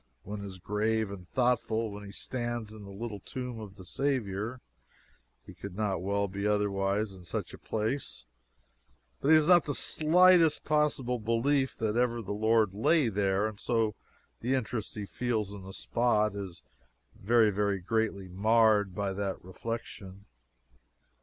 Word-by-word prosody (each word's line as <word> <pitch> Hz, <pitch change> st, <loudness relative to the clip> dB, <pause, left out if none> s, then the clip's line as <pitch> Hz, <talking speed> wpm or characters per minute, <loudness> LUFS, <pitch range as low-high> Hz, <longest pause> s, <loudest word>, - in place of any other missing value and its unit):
One 105 Hz, +1 st, -6 dB
is 95 Hz, -2 st, -7 dB
grave 105 Hz, +3 st, 0 dB
and 90 Hz, -3 st, -9 dB
thoughtful 120 Hz, -3 st, +1 dB
when 105 Hz, 0 st, -8 dB
he 100 Hz, -, -9 dB
stands 120 Hz, -1 st, -4 dB
in 105 Hz, -2 st, -10 dB
the -, -, -10 dB
little 105 Hz, +1 st, -6 dB
Tomb 125 Hz, +3 st, -6 dB
of 105 Hz, -3 st, -9 dB
the 95 Hz, -, -12 dB
Saviour 120 Hz, -2 st, -2 dB, 0.9 s
he -, -, -11 dB
could 100 Hz, -2 st, -8 dB
not 100 Hz, -4 st, -1 dB
well 100 Hz, +2 st, 0 dB
be 100 Hz, +2 st, -3 dB
otherwise 100 Hz, 0 st, 0 dB
in 95 Hz, -1 st, -13 dB
such 90 Hz, -, -4 dB
a -, -, -10 dB
place 110 Hz, -, -3 dB, 0.9 s
but -, -, -2 dB
he 160 Hz, -, +8 dB
has 155 Hz, -1 st, +4 dB
not 175 Hz, -2 st, +6 dB
the 145 Hz, -, -2 dB
slightest 170 Hz, 0 st, +4 dB
possible 145 Hz, -5 st, +1 dB
belief 130 Hz, +5 st, +1 dB
that 110 Hz, -1 st, -1 dB
ever 120 Hz, -1 st, +1 dB
the 100 Hz, -, -4 dB
Lord 110 Hz, -1 st, +3 dB
lay 125 Hz, +6 st, +3 dB
there, 100 Hz, 0 st, +1 dB
and 110 Hz, -2 st, -4 dB
so 115 Hz, -3 st, +1 dB, 0.5 s
the 125 Hz, +3 st, 0 dB
interest 120 Hz, -3 st, -3 dB
he 105 Hz, -2 st, -4 dB
feels 110 Hz, -2 st, -2 dB
in 100 Hz, -, -8 dB
the 95 Hz, +1 st, -9 dB
spot 105 Hz, -1 st, +1 dB
is 95 Hz, -4 st, -7 dB, 0.5 s
very, 110 Hz, +1 st, +3 dB
very 100 Hz, 0 st, +1 dB
greatly 100 Hz, 0 st, -1 dB
marred 105 Hz, 0 st, +3 dB
by 100 Hz, -1 st, -1 dB
that 95 Hz, -2 st, -3 dB
reflection. 100 Hz, -1 st, -7 dB
110 Hz, 160 wpm, -30 LUFS, 100-120 Hz, 0.9 s, he